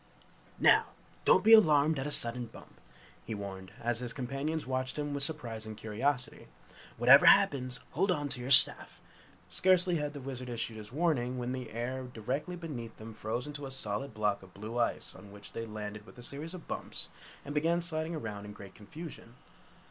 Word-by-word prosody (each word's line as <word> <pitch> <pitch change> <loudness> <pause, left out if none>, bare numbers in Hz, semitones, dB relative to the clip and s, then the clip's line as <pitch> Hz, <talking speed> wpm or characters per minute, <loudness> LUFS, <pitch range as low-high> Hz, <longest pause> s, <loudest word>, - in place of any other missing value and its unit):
"Now, - - +4 0.4
don't - - +5
be 225 +2 +7
alarmed 155 -7 +5
at 135 - -3
a - - -4
sudden 120 -2 +2
bump!" 115 - -16 0.4
he 110 - -5
warned, 95 -2 -8
as 120 0 +1
his 120 -1 -1
companions 140 +5 -4
watched 130 +1 -3
him 145 -1 -3
with 140 - -3
surprise 120 -7 0
and 110 -1 -8
curiosity! 125 - -3 0.5
"Whatever - - +7
happens 130 -2 +4
hold 190 +7 0
on 145 -5 0
to 125 - -3
your 125 - -6
staff!" 135 - +8 0.5
Scarcely 180 -1 +2
had 150 -1 -3
the 145 - -7
Wizard 130 -2 -7
issued 115 -1 -4
his 105 0 -10
warning 130 -5 0
when 125 0 -3
the 130 -2 -5
air 130 +3 -4
directly 135 +10 -4
beneath 140 -10 -8
them 110 +1 -10
froze 110 +3 -4
into 145 -1 -7
a - - -8
solid 130 -1 -4
block 105 -2 0
of 95 -1 -17
blue 110 +4 -5
ice 120 - -2
on 100 - -14
which 105 0 -13
they 115 0 -5
landed 105 0 -7
with - - -16
a 120 - -11
series 150 +7 -6
of 175 - -12
bumps, - - -4 0.4
and 145 - -6
began 165 +3 +1
sliding 165 -1 -3
around 105 -8 -6
in 105 - -9
great 100 -2 -12
confusion. 125 - -11
125 Hz, 190 wpm, -31 LUFS, 110-150 Hz, 0.5 s, staff